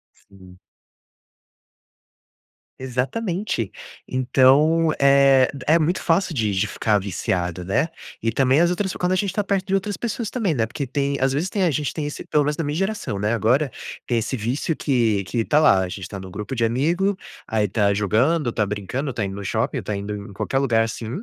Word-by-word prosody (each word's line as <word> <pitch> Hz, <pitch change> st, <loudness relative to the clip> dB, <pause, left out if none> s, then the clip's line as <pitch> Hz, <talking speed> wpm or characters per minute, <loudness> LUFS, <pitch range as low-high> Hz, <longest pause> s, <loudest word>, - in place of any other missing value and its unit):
Sim. 95 Hz, -2 st, -18 dB, 2.2 s
Exatamente. 130 Hz, -, -2 dB, 0.4 s
Então, 140 Hz, +6 st, +4 dB
eh, 140 Hz, -1 st, +5 dB, 0.2 s
é 165 Hz, +2 st, +6 dB
muito 165 Hz, +3 st, 0 dB
fácil 170 Hz, 0 st, +1 dB
de 110 Hz, -4 st, 0 dB
de 95 Hz, +2 st, +1 dB
ficar 105 Hz, 0 st, +1 dB
viciado, 90 Hz, -2 st, -2 dB
né. 100 Hz, -, +1 dB, 0.3 s
E 115 Hz, -, 0 dB
também 135 Hz, +2 st, +3 dB
as 170 Hz, 0 st, +4 dB
outras 185 Hz, +1 st, -1 dB
quando 180 Hz, +1 st, -1 dB
a -, -, +3 dB
gente 195 Hz, +1 st, 0 dB
está 210 Hz, +3 st, -1 dB
perto 195 Hz, -1 st, -1 dB
de 195 Hz, -, +1 dB
outras 200 Hz, +1 st, -1 dB
pessoas 235 Hz, -1 st, -3 dB
também, 210 Hz, -10 st, 0 dB
né. 115 Hz, -4 st, +1 dB
Porque 135 Hz, +5 st, -4 dB
tem, 140 Hz, +2 st, -1 dB
às 135 Hz, +1 st, +2 dB
vezes 155 Hz, +7 st, -1 dB
tem, 195 Hz, 0 st, -1 dB
a 175 Hz, -, +3 dB
gente 145 Hz, 0 st, -2 dB
tem 155 Hz, -, -3 dB
esse 145 Hz, -, -7 dB
pelo 150 Hz, -, +2 dB
menos 150 Hz, +1 st, -1 dB
da 165 Hz, -, -2 dB
minha 145 Hz, +1 st, -2 dB
geração, 195 Hz, -, -2 dB
né. 105 Hz, +2 st, 0 dB
Agora 125 Hz, +5 st, +2 dB, 0.4 s
tem 120 Hz, -2 st, +1 dB
esse 115 Hz, +4 st, -2 dB
vício 125 Hz, +8 st, -1 dB
que 115 Hz, -7 st, +1 dB
que 115 Hz, +4 st, -1 dB
tá 150 Hz, +5 st, +3 dB
lá. 100 Hz, -11 st, +5 dB
A -, -, -4 dB
gente 90 Hz, 0 st, -7 dB
tá 100 Hz, -, -7 dB
no 95 Hz, 0 st, -9 dB
grupo 105 Hz, +7 st, -5 dB
de 115 Hz, -, +1 dB
amigo, 170 Hz, -, +1 dB, 0.3 s
aí 105 Hz, -2 st, 0 dB
tá 100 Hz, 0 st, +2 dB
jogando, 120 Hz, -, +1 dB
tá 105 Hz, -, 0 dB
brincando, 105 Hz, +8 st, -3 dB
tá 105 Hz, -, -2 dB
indo 95 Hz, 0 st, -5 dB
no 100 Hz, -, -6 dB
shopping, -, -, -1 dB
tá 105 Hz, -, -3 dB
indo 100 Hz, +1 st, -5 dB, 0.2 s
em -, -, -11 dB
qualquer 135 Hz, +6 st, -1 dB
lugar, 120 Hz, -5 st, +2 dB
assim, 115 Hz, 0 st, -4 dB
130 Hz, 200 wpm, -22 LUFS, 105-165 Hz, 2.2 s, é